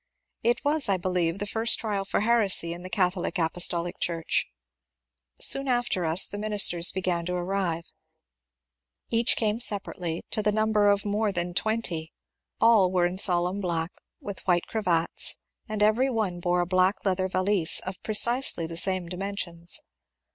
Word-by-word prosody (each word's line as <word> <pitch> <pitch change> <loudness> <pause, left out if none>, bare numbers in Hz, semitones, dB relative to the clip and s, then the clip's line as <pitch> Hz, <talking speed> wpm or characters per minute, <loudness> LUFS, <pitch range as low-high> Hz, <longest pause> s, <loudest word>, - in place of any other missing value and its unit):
It 240 +5 -1
was 295 -4 +2
I 195 - +2
believe 180 -1 -1
the 205 - -4
first 225 +3 +3
trial 205 -3 -3
for 195 - -1
heresy 210 -7 +2
in 175 - -9
the 185 - -8
Cath 180 0 +1
olic 185 +1 -4
Apostolic 175 +1 +1
Church. 165 -2 -1 0.9
Soon 275 0 +4
after 240 -8 -1
us 160 +3 +6
the 205 - -6
ministers 205 -5 +3
began 180 -2 -2
to 180 - -3
arrive; 175 -2 -3 1.2
each 230 +1 +2
came 215 0 -1
separately, 180 -6 -1
to 215 - 0
the 210 0 +1
number 215 -1 +2
of 200 0 +1
more 210 +1 -1
than 175 -1 -3
twenty. 180 -6 -2 0.5
All 220 -5 +4
were 180 -2 +1
in 180 +2 -2
solemn 180 +1 +2
black, 170 -2 -2 0.3
with 200 -2 -7
white 175 -1 +2
cravats, 175 -7 0 0.3
and 215 -1 -1
every 230 +6 +2
one 210 -8 -2
bore 175 0 0
a - - -1
black 185 +3 +1
leather 185 -1 0
valise 185 -2 +1
of 185 0 -8
precisely 235 -3 +2
the 165 0 -5
same 185 0 +1
dimensions. 180 - -3
190 Hz, 160 wpm, -26 LUFS, 175-215 Hz, 1.2 s, us